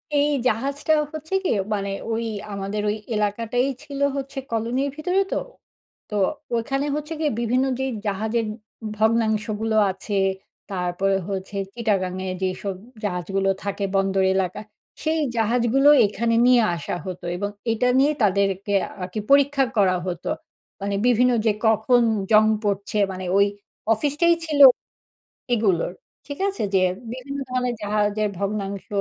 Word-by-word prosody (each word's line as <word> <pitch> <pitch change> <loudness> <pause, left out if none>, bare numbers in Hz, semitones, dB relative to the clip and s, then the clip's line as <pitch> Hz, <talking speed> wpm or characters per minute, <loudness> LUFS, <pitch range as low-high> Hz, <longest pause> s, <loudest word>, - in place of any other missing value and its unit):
এই 290 +1 +3 0.2
জাহাজটা 275 +7 0 0.2
হচ্ছে 315 +3 -7
গিয়ে, 225 - +2 0.2
মানে 200 -1 -2 0.2
ওই 225 +1 -1 0.3
আমাদের 200 +1 -3
ওই 210 - 0 0.2
এলাকাটাই 225 +4 0 0.2
ছিল 285 -2 -7 0.2
হচ্ছে 275 0 -5
কলোনির 235 +5 0
ভিতরে 360 +5 +1
তো। - - +1 0.7
তো 210 - -4 0.4
ওইখানে 270 +5 -1
হচ্ছে 300 +2 -4
গিয়ে 310 -2 +1
বিভিন্ন 250 +3 +2
যেই 265 0 -1 0.2
জাহাজের 220 +3 -1 0.5
ভগ্নাংশগুলো 220 0 +1 0.2
আছে, 195 +2 -3 0.5
তারপরে 185 +1 0
হচ্ছে 195 0 -5 0.2
চিটাগাং 200 -6 0
এ - - -2
যেসব 190 +1 -2 0.3
জাহাজগুলো 195 0 -1
থাকে 200 0 -3
বন্দর 195 0 +2
এলাকা, 190 0 -1 0.4
সেই 320 +1 +1 0.2
জাহাজগুলো 240 +5 +3 0.2
এখানে 230 +3 0
নিয়ে 250 -1 +6
আসা 170 - -4
হতো। 180 -2 -6
এবং 205 +2 -2 0.2
এইটা 225 +2 +1
নিয়ে 285 +3 +4
তাদেরকে 200 0 +1 0.3
আরকি 180 +3 -4
পরীক্ষা 280 0 +5
করা 190 -3 +4
হতো। 175 -1 -4 0.5
মানে 200 0 -1
বিভিন্ন 250 +1 +4
যে, 220 - +5 0.2
কখন 220 +3 +4 0.3
জং 215 0 +7 0.2
পড়ছে? 200 0 -1
মানে 185 0 -6
ওই 200 - +6 0.5
অফিসটাই 295 +8 +2
ছিল 300 -2 -1 1.0
এগুলোর, 195 -7 +1 0.3
ঠিক 285 0 -6
আছে? 395 - -4
যে 190 - +5 0.3
বিভিন্ন 265 +3 -6
ধরণের 250 -1 -1
জাহাজের 210 0 +1
ভগ্নাংশ, 200 -1 -3
220 Hz, 130 wpm, -23 LUFS, 200-255 Hz, 1.0 s, জং